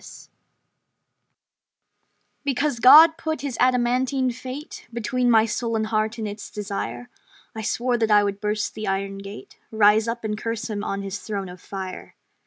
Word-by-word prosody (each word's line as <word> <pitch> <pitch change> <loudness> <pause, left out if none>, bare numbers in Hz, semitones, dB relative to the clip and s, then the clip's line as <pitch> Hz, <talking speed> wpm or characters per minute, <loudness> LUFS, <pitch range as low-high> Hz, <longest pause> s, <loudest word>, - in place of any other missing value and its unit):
Failure - - -13 2.1
Because 280 -2 -1
God 315 +6 +8
put 315 -1 -3
His 275 -3 -4
adamantine 255 +1 +2
fate 255 +4 -8
Between 245 +2 -1
my 225 -2 +5
sullen 230 0 -2
heart 215 +1 -1
and 220 -2 -3
its 205 +1 -7
desire, 195 - -5 0.4
I 220 - -4
swore 240 +2 -1
that 225 -1 +1
I 205 -1 +5
would 200 0 -3
burst 210 0 -1
the 215 - -6
Iron 195 0 -2
Gate, 210 - -11
Rise 215 0 +4
up, 230 0 -3
and 215 -1 -2
curse 225 +1 -4
Him 205 -1 -3
on 200 0 -3
His 195 +1 -5
throne 200 -4 -5
of 180 0 -11
fire. 190 -2 -7
220 Hz, 160 wpm, -23 LUFS, 205-250 Hz, 2.1 s, God